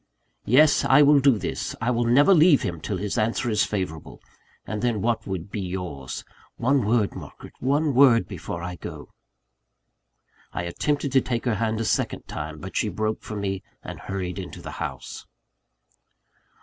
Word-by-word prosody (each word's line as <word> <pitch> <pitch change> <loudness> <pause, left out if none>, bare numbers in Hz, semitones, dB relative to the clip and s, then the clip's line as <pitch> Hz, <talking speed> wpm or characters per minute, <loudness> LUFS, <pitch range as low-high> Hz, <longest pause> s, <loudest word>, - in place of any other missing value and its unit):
"Yes, 150 +6 +5
I 145 +3 +6
will 145 0 +6
do 135 -4 +4
this; - - -4
I 115 +2 0
will 120 0 +1
never 140 +11 +5
leave 160 -3 +5
him 85 -5 -3
till 100 - -3
his 100 +2 -2
answer 115 +2 0
is 105 -2 +3
favourable 95 -7 -5 0.5
and 105 +1 -4
then 120 -3 0
what 115 +1 -1
would 95 0 -5
be 105 - -3
yours? 90 -8 -5 0.3
One 130 +1 +2
word, 110 -3 +1
Margaret; - - -10
one 145 +3 +1
word 125 -3 +5
before 85 -3 -6
I 90 0 -5
go - - -9 0.7
" - - -38
I - - -2
attempted 140 - -1
to 135 0 +4
take 120 -1 -3
her 120 - +2
hand 110 +1 -1
a 115 - -1
second 105 - -1
time; 75 0 -6
but 95 +5 -9
she 110 - +1
broke 110 +3 -2
from 105 -2 -6
me, 95 -1 -2 0.2
and - - -8
hurried 95 -1 -4
into 95 - -7
the - - -8
house. - - -6
110 Hz, 175 wpm, -25 LUFS, 95-130 Hz, 0.7 s, I